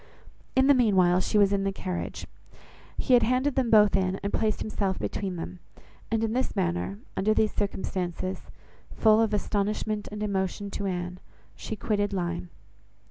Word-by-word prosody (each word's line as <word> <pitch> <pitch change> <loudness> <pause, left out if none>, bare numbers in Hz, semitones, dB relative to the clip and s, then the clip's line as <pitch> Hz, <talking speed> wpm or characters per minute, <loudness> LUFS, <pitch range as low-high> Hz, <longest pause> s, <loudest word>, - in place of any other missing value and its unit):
In 260 0 +5
the 285 - +7
meanwhile 190 -8 +4
she 210 - 0
was 200 -1 +4
in 195 -1 +1
the 195 - 0
carriage. 185 -2 -5 0.7
He 260 - +1
had 245 - +7
handed 255 +4 +1
them 255 -3 +1
both 210 -2 +6
in, 190 -1 +1
and 200 - -2
placed 215 -2 0
himself 200 -3 -1
between 190 -3 -3
them; 175 +1 -6 0.5
and 225 0 0
in 225 0 0
this 255 +2 -1
manner, 90 +3 -1 0.2
under 215 +3 +2
these 215 -1 +2
circumstances, 185 -2 -3 0.6
full 220 0 +5
of 225 -2 +1
astonishment 210 +1 -1
and 210 0 -4
emotion 200 0 -2
to 200 - -3
Anne, 180 -1 -3 0.4
she 220 - -5
quitted 205 -2 -1
Lyme. 175 -1 -3
200 Hz, 165 wpm, -27 LUFS, 185-215 Hz, 0.7 s, the